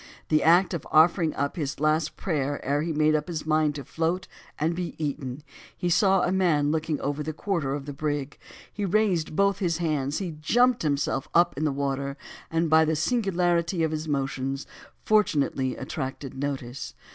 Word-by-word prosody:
In 155 - -2
the - - +1
act 175 +3 +5
of 170 - -4
offering 160 +1 +5
up 140 +1 -1
his 145 -4 -3
last 155 +1 +1
prayer 145 -5 -1
ere 145 +2 +1
he 165 +2 -2
made 155 0 +3
up 150 -1 0
his 165 -4 -4
mind 155 -1 +2
to 140 - -5
float 170 +3 -1 0.3
and 160 +3 0
be 175 -1 -4
eaten, 145 -2 -4 0.3
he 175 - -1
saw 190 +1 +4
a 180 - +1
man 165 -6 +2
looking 160 -1 -1
over 145 +1 -2
the 155 +1 -3
quarter 155 -6 -1
of 140 -1 -6
the 145 - -6
brig; 145 -1 -3 0.3
he 205 - -4
raised 190 -6 +1
both 200 +2 +2
his 170 -5 0
hands, 150 -4 -1
he 175 -5 -4
jumped 245 +8 +3
himself 140 -2 0
up 175 +1 +4
in 150 +3 -1
the 150 - +2
water, 140 0 -2 0.3
and 165 +1 +1
by 160 0 +5
the 160 0 +1
singularity 175 -2 +1
of 160 - +1
his 155 0 -3
motions, 135 -1 -2 0.4
fortunately 145 -11 +2
attracted 130 0 -5
notice. 135 -2 -5
155 Hz, 185 wpm, -26 LUFS, 145-175 Hz, 0.4 s, act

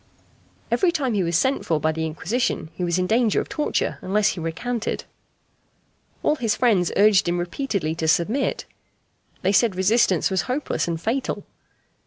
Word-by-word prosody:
Every 370 -3 +3
time 275 -7 -1
he 200 - +1
was 170 -2 +1
sent 265 +9 +1
for 160 -2 0
by 155 +1 +1
the 160 0 -2
Inquisition 160 - -2
he 180 - -5
was 170 0 +1
in 185 - +1
danger 225 +1 +2
of - - -4
torture 300 - -1
unless 205 +2 +2
he - - -4
recanted. 230 +8 -3 1.2
All 305 - +2
his 230 -5 0
friends 205 -9 +2
urged 205 -3 +5
him 175 - 0
repeatedly 175 - -2
to 160 -1 -3
submit. 205 - +1 0.8
They 190 - +3
said 205 0 +3
resistance 190 -2 +2
was 190 -2 +1
hopeless 270 -5 -1
and 165 -1 -2
fatal. 240 +9 -2
195 Hz, 165 wpm, -23 LUFS, 170-240 Hz, 1.2 s, urged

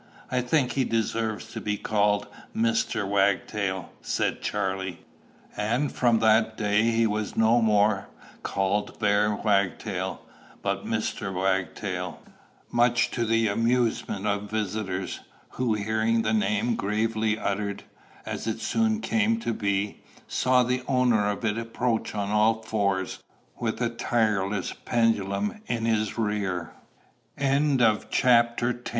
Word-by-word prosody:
"I 130 -1 +1
think 125 +1 +1
he 135 - +1
deserves 115 -1 -1
to - - -5
be 105 -1 -1
called 105 -1 +1 0.3
Mr. 220 - +1
Wagtail," 100 -1 0
said - - -1
Charley. 95 -3 -2 0.5
And 120 +7 0
from 120 -2 +3
that 110 0 +3
day 105 -1 +2
he 115 0 +2
was 105 -1 -2
no 115 +2 +4
more 105 -2 +3 0.3
called 95 +2 -1
bare 105 0 +2
Wagtail, 100 -3 -1 0.4
but - - -2
Mr. 95 - -2
Wagtail, 95 -1 -2 0.5
much 120 0 +3
to 120 - -1
the 115 0 +2
amusement 115 -2 0
of 105 0 -1
visitors, 100 -3 -3 0.3
who, 120 -4 0
hearing 110 +2 +1
the 110 0 +1
name 105 +2 +1
gravely 110 +1 0
uttered, 100 -1 -2 0.4
as - - -5
it 110 0 -2
soon 220 - +1
came 225 +1 +1
to 115 - -1
be, 100 -1 -1 0.3
saw 130 0 +3
the 125 +1 0
owner 125 -6 +3
of 105 +3 -3
it 110 +1 0
approach 115 -1 -2
on 100 -1 -2
all 110 +1 +3
fours, 100 -4 -1 0.4
with 115 -2 -2
a 120 -1 +1
tireless 105 -5 0
pendulum 115 - 0
in 115 -2 -1
his 110 -1 0
re 105 -5 -1
110 Hz, 120 wpm, -26 LUFS, 100-115 Hz, 0.5 s, no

